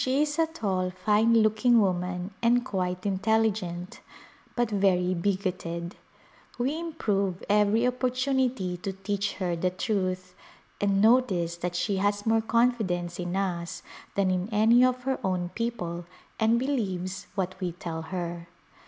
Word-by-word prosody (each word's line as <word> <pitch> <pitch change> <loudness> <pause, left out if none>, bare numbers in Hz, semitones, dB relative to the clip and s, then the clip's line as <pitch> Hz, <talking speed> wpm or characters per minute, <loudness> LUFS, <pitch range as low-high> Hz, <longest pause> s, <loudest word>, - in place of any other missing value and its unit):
She 265 +3 +2
is 300 +1 -3
a 325 - +4
tall, 195 - -1
fine 210 +5 +2
looking 230 +2 +4
woman 180 -1 -1
and 240 +1 +3
quite 185 -4 -2
intelligent, 195 -3 0 0.6
but 240 -2 0
very 185 -3 +2
bigoted. 180 -2 -2 0.6
We 270 +6 -1
improve 200 - -1
everv 210 +3 +3
opponunity 255 -7 -1
to 195 - -3
teach 200 +1 -2
her 180 -2 -2
the 180 +2 0
truth, 185 -1 -2 0.5
and 200 0 +2
notice 200 -8 +3
that 175 0 -3
she 195 +3 0
has 205 +1 0
more 225 0 +3
confidence 220 -7 0
in 175 +1 -3
us 175 -3 -2 0.3
than 195 -2 +2
in 185 +2 -1
any 225 +4 +5
of 255 0 +2
her 265 0 -1
own 180 -2 -1
people 180 -7 -4 0.3
and 225 +1 +4
believes 190 -9 -2
what 185 -2 -1
we 180 -1 -1
tell 165 -2 -5
her. 170 0 -5
195 Hz, 140 wpm, -27 LUFS, 180-230 Hz, 0.6 s, any